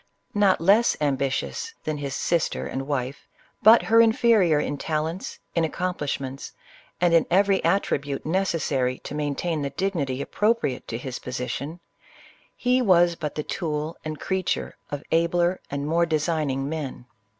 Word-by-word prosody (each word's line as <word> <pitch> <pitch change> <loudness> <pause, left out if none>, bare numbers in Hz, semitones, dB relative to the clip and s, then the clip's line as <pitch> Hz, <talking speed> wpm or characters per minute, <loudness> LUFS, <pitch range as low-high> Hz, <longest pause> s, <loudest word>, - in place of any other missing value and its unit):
Not 205 -2 +3
less 200 +8 +4
ambitious 140 - -1
than 155 -1 -3
his 140 -1 -4
sister 170 -2 0
and 135 +1 -4
wife, 140 -2 -3 0.3
but 225 +2 +7
her 230 +1 +5
inferior 220 -8 +4
in 145 -1 -2
talents, 160 +4 -3 0.2
in 165 - +1
accom 180 +3 -1
plishments, 135 -2 -4 0.5
and 175 -1 +3
in 165 - +4
every 195 +1 +3
attribute 145 -6 0
necessary 155 -7 0
to - - -9
main 145 -1 -2
tain 165 -2 -2
the 140 - -2
dignity 145 -6 -2
appropriate 210 - 0
to 115 - -3
his 125 +1 -6
position, 135 +6 -5 0.7
he 250 +1 +2
was 175 -6 +5
but 155 -3 -5
the 150 - -2
tool 155 0 -3
and 155 -1 -5
creature 190 -1 -2
of 145 0 -5
abler 175 +2 +2
and 140 0 -3
more 170 +3 +2
designing 155 -4 0
men. 145 -5 -5
160 Hz, 150 wpm, -25 LUFS, 140-185 Hz, 0.7 s, but